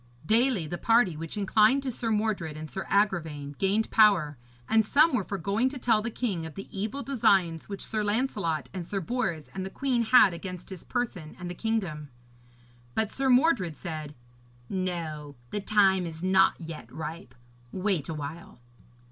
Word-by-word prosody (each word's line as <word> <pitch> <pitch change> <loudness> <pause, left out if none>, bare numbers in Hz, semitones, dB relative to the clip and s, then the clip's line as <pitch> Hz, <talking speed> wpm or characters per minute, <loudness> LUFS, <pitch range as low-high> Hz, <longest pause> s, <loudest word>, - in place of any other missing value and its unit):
Daily 225 -2 +3
the 175 +3 -5
party 225 -7 +3
which 165 +5 -6
inclined 215 +6 +3
to 265 - -2
Sir 230 0 -3
Mordred 210 -8 -1
and 155 0 -6
Sir 190 +5 -6
Agravaine 160 -8 0
gained 200 +3 +1
power, 195 -9 +4 0.3
and 220 0 +4
some 295 +8 +4
were 215 - +1
for 200 - -4
going 200 +8 +1
to 270 - -7
tell 230 -4 +2
the 230 - -2
king 215 -8 -2
of 160 -2 -8
the 195 - -7
evil 220 +8 -3
designs 190 - +2
which 200 -1 -5
Sir 215 -1 -2
Lancelot 205 - -1
and 180 - -4
Sir 195 +4 -3
Bors 190 - -2
and 190 - -4
the 190 - -4
queen 255 +2 0
had 230 -4 +6
against 180 +2 -7
his 185 - -8
person 210 -11 -4
and 175 -1 -5
the - - -4
kingdom. 180 -8 -2 0.9
But 220 -1 +1
Sir 270 0 0
Mordred 250 - +3
said, 155 -4 -6 0.5
'No, 165 -6 -3 0.2
the 205 - -2
time 195 -3 +3
is 160 +1 -8
not 190 +1 +4
yet 165 -2 -8
ripe. 155 -5 -7 0.4
Wait 185 -6 -1
a 160 - -3
while.' 150 -1 -8
190 Hz, 175 wpm, -28 LUFS, 165-220 Hz, 0.9 s, had